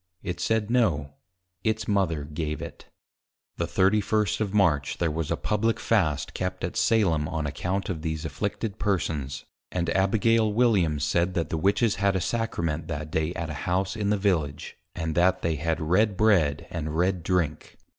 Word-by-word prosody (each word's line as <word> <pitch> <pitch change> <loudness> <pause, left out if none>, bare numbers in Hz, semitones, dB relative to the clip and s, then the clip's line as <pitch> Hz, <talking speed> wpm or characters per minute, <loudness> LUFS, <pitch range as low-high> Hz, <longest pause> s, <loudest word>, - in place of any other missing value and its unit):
It 90 -1 -4
said 110 +3 0
no, 80 - +1 0.5
its 110 0 0
Mother 95 -7 +1
gave 75 +1 -4
it. - - -9 0.7
The - - -1
31 105 +2 +2
of 105 -3 -1
March 85 -9 +2
there 85 -2 0
was 80 0 -3
a - - 0
Publick 110 +2 0
Fast 85 -11 +1
kept 90 0 -3
at 85 - -3
Salem 90 -10 +2
on 80 -1 -3
account 90 +7 -2
of 85 -4 -3
these 80 -1 -3
Afflicted 100 +7 -3
Persons. 75 -8 -1 0.3
And 85 -2 -1
Abigail 110 +4 +3
Williams 100 -10 +2
said, 85 +4 +1
that 85 -2 -1
the - - 0
Witches 100 +6 +2
had 100 -1 +2
a - - +2
Sacrament 85 -6 -2
that 75 -1 -5
day 80 +2 0
at 80 -2 -3
an - - -5
house 95 +4 0
in 105 -2 -1
the 105 - +2
Village, 85 -8 -1 0.2
and 80 -2 -2
that 90 +3 +2
they 80 -2 0
had 80 +2 -1
Red 95 +5 +2
Bread 85 -10 +3
and 80 -2 -3
Red 90 +1 +1
Drink. 85 -3 -1
90 Hz, 175 wpm, -26 LUFS, 80-105 Hz, 0.7 s, Abigail